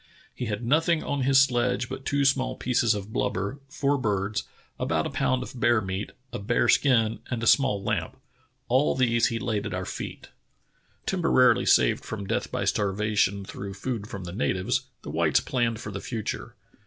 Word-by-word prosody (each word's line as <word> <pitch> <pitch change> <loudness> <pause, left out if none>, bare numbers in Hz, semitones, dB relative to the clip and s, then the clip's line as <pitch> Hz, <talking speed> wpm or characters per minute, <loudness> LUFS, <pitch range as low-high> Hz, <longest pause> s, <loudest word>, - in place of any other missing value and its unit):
"lie 125 - -2
had 105 +2 -3
nothing 160 +5 +2
on 145 -1 -2
his 135 +1 +5
sledge 125 -2 +2
but 130 +1 -7
two 140 0 +1
small 135 -1 +2
pieces 120 -3 +1
of 105 +1 -6
blubber, 100 +9 -1
four 140 0 0
birds, 100 -2 -1 0.3
about - - 0
a - - -3
pound 130 -1 0
of 125 - -9
bear 120 -1 +4
meat, 95 0 -4 0.2
a - - -3
bear 120 +4 +1
skin, 115 -5 +3
and 120 -2 -3
a - - 0
small 115 -5 +3
lamp. - - -2 0.5
All 130 +4 +3
these 120 -2 +3
he 115 - -2
laid 110 -4 -2
at 95 - -4
our 95 0 -3
feet." - - -7 0.8
Temporarily 165 -9 +3
saved - - +4
from 100 -3 -5
death - - -2
by - - -1
starvation 100 -1 +1
through 95 0 -7
food 110 0 -4
from 95 -3 -7
the 85 0 -7
natives, 95 -2 0 0.2
the - - -6
whites - - +3
planned 115 -3 -1
for 105 - -6
the 100 0 -5
future. 110 -4 -5
115 Hz, 180 wpm, -26 LUFS, 100-130 Hz, 0.8 s, his